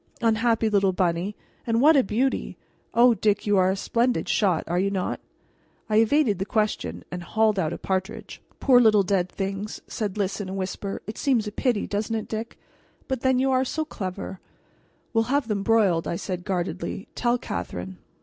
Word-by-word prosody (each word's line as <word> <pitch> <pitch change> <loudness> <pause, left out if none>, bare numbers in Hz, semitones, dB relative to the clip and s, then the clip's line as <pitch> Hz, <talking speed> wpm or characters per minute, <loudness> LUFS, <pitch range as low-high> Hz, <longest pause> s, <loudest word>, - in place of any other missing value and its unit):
"Unhappy 225 0 +2
little 200 -3 +2
bunny 180 +2 0 0.3
and 230 0 +2
what 305 +5 +6
a 275 - +6
beauty! 245 +7 -1 0.4
O 240 +1 +6
Dick, 210 -2 +1
you 205 -1 +3
are 185 0 +4
a 190 - +1
splendid 240 +5 0
shot, 185 -6 +2
are 175 +2 0
you 195 +2 +1
not?" 190 -2 -2 0.7
I 215 - +4
evaded 225 -2 +3
the - - 0
question 210 - -1
and 180 - -4
hauled 215 +2 +1
out 160 -3 0
a - - -4
partridge. 190 +1 -4 0.2
"Poor 250 -3 +6
little 215 -3 +5
dead 185 -2 0
things'" 195 +2 -4
said 210 -3 -3
Lys 200 0 -1
in 190 - -5
a 190 - -4
whisper; 195 +1 -4
"it 215 - -7
seems 250 -6 +2
a 210 - -4
pity 230 -1 0
doesn't 210 +2 -2
it, 220 - -3
Dick? 220 +1 -5 0.5
But 260 -2 -2
then 260 -1 +3
you 265 +1 +2
are 260 0 +3
so 315 +4 -2
clever 190 -6 -6 0.4
" - - -39
"We'll 225 -1 +2
have 275 0 0
them 210 -3 -1
broiled," 195 -6 +2
I - - -1
said 180 0 -5
guardedly, 185 +1 -3
"tell 240 0 +1
Catherine." 90 - -5
210 Hz, 190 wpm, -25 LUFS, 190-230 Hz, 0.7 s, what